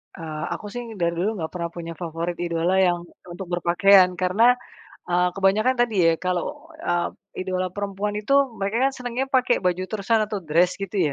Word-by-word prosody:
Eee, 155 -3 -6
aku, - - -7
sih, 245 - -4 0.2
dari 170 -1 +1
dulu 190 +4 +1
gak 160 - -4
pernah 170 -2 -3
punya 170 -1 -6
favorit 170 +1 -4
idola 175 +2 +1
yang 180 -2 +3 0.3
untuk 180 +1 -7
berpakaian, 180 +2 +5
karena, 195 +7 +4 0.5
eee, 180 0 +3
kebanyakan 200 +6 +2
tadi, 240 -2 +2 0.2
ya, - - +3
kalau, 185 - -3
eee, 175 - 0 0.3
idola 185 0 -2
perempuan 200 +1 -3
itu 215 +6 0 0.2
mereka, 200 +3 -1
kan, - - -15
senangnya 250 +1 -2
pakai 255 -4 +2
baju 180 0 +1
terusan 220 +1 +1
atau 205 -2 -4
dress 170 +3 +2
gitu, 190 -5 -1
185 Hz, 175 wpm, -23 LUFS, 175-210 Hz, 0.5 s, berpakaian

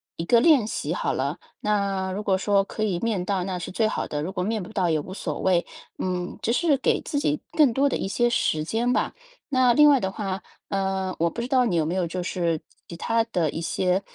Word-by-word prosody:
一 165 - -4
个 235 +6 +5
练 275 -5 +5
习 - - -3
好 - - -1
了。 - - -2 0.2
那 200 -2 0
如 205 +2 -4
果 190 -2 +2
说 200 0 +2
可 215 +2 -4
以 185 -5 0
面 215 -6 -1
到， 190 -2 0
那 185 -1 -3
是 - - -6
最 220 +3 +1
好 - - -2
的。 150 0 -3
如 180 +5 -3
果 180 - -2
面 215 0 -1
不 180 - -10
到， 185 -5 +1
也 155 -1 +2
无 185 +6 -7
所 - - -4
谓。 180 -2 +2 0.3
嗯， 180 -1 -3
只 230 - +1
是 305 -1 +3
给 - - +1
自 285 - -2
己 295 +1 0
更 300 -7 +4
多 275 +2 +3
的 - - -1
一 - - -3
些 240 +4 +1
时 155 -9 +1
间 235 +9 0
吧。 - - 0 0.4
那 255 -3 +4
另 295 +2 +7
外 275 -3 +5
的 190 - -1
话， 195 -2 -4 0.3
呃， 190 -1 -1
我 170 +1 +2
不 235 - -5
知 240 - -3
道 255 -2 +4
你 185 - 0
有 160 -2 +2
没 170 +4 -2
有 180 -2 0
就 180 +2 -4
是 170 -3 -1 0.3
其 170 - -8
他 230 +6 +1
的 175 -9 0
一 - - -4
些 180 +3 0
195 Hz, 265 characters per minute, -25 LUFS, 180-235 Hz, 0.4 s, 另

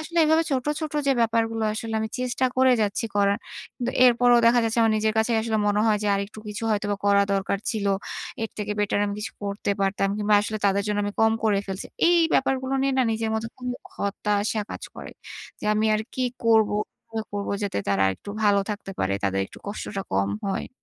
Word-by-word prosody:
আসলে 335 +2 -3
এভাবে 320 +1 +4
ছোট, 260 -2 0 0.2
ছোট 310 -1 -4
যে 275 - +5
ব্যাপারগুলো 225 -1 +1
আসলে 225 0 -4
আমি 220 - -2
চেষ্টা 255 +1 -1
করে 260 0 +5
যাচ্ছি 205 +2 -1
করার। 200 0 +3 0.4
কিন্তু 245 0 -2
এরপরেও 245 0 +5
দেখা 240 +1 +5
যাচ্ছে 225 +1 -1
আমার 225 -1 +3
নিজের 215 0 +1
কাছেই 225 +1 +2
আসলে 220 -1 0
মনে 205 0 +2
হয় 210 -1 +3
যে, 210 - -1
"আরেকটু 200 +2 -4
কিছু 210 +2 -6
হয়তোবা 205 -1 0
করা 200 0 +5
দরকার 195 0 -1
ছিলো। 200 -3 0 0.5
এর 225 - -3
থেকে 210 0 -2
বেটার 205 0 +1
আমি 200 - -3
কিছু 210 - -5
করতে 200 0 -2
পারতাম 195 0 +1
কিংবা 210 0 +2
আসলে 215 +1 -3
তাদের 200 +1 +2
জন্য 210 0 -1
আমি 205 - -3
কম 220 0 +5
করে 210 -2 +3
ফেলছি।" 195 0 -5 0.2
এই 345 0 +5 0.2
ব্যাপারগুলো 265 0 +1
নিয়ে 275 0 +1
না - - +5
নিজের 220 0 -2
মতো 220 +1 -2
খুবই 250 -1 -4 0.2
হতাশা 205 +1 -1
কাজ - - -7
করে। - - -8 0.5
যে, - - -8
"আমি 215 +1 +2
আর 215 - 0
কি 255 - 0 0.2
করবো? 220 -2 +4 0.2
কিভাবে 225 -1 -5
করবো? 200 0 -2
যাতে 200 - -1
তারা 100 -1 +2
আরেকটু 95 - -3
ভালো 200 -1 +4
থাকতে 205 -1 -5
পারে। 95 +1 0
তাদের 95 0 +1
একটু - - -14
কষ্টটা 205 -1 -4
কম 100 +1 +1 0.2
হয়।" 195 - -2
215 Hz, 205 wpm, -25 LUFS, 200-230 Hz, 0.5 s, যে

